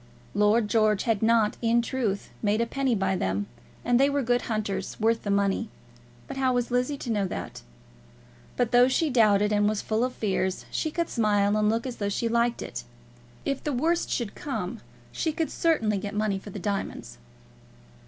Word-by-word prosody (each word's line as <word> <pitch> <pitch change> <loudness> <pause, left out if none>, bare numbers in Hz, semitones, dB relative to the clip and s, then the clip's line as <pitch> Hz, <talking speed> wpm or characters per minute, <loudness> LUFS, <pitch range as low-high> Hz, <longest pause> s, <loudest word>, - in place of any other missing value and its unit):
Lord 210 +2 +3
George 215 -2 +2
had 225 -4 0
not, 225 -1 +3
in 235 0 +3
truth, 230 -6 -2
made 210 0 +1
a 235 - +2
penny 265 0 0
by 190 -1 0
them, 95 - -1 0.4
and 245 0 +3
they 275 +1 +5
were 280 -1 0
good 245 +1 +2
hunters, 215 -3 -3
worth 225 +1 +2
the 205 - -5
money; 200 +2 +1 0.6
but 270 - -7
how 260 -1 +2
was 245 0 -1
Lizzie 250 +4 0
to 245 - -4
know 205 -3 +1
that? 180 - -6 1.0
But 245 -2 +1
though 245 0 +6
she 295 +3 +1
doubted, 210 -4 +4
and 205 0 +3
was 215 -1 -2
full 220 +2 0
of 255 0 -1
fears, 190 -4 -1
she 315 - -1
could 335 +2 -1
smile 205 -3 +2
and 210 0 +2
look 230 +3 0
as 255 -2 -5
though 200 -1 -1
she 230 +3 -1
liked 235 +1 +1
it. - - -6 0.6
If 275 -1 -2
the 295 - -1
worst 330 +7 +1
should 235 -5 -2
come 285 - -4 0.3
she 320 - -1
could 320 +1 -2
certainly 225 -12 +1
get 205 +1 -5
money 210 -2 0
for 205 - -11
the 205 - -7
diamonds. 190 - -4
225 Hz, 195 wpm, -27 LUFS, 205-250 Hz, 1.0 s, though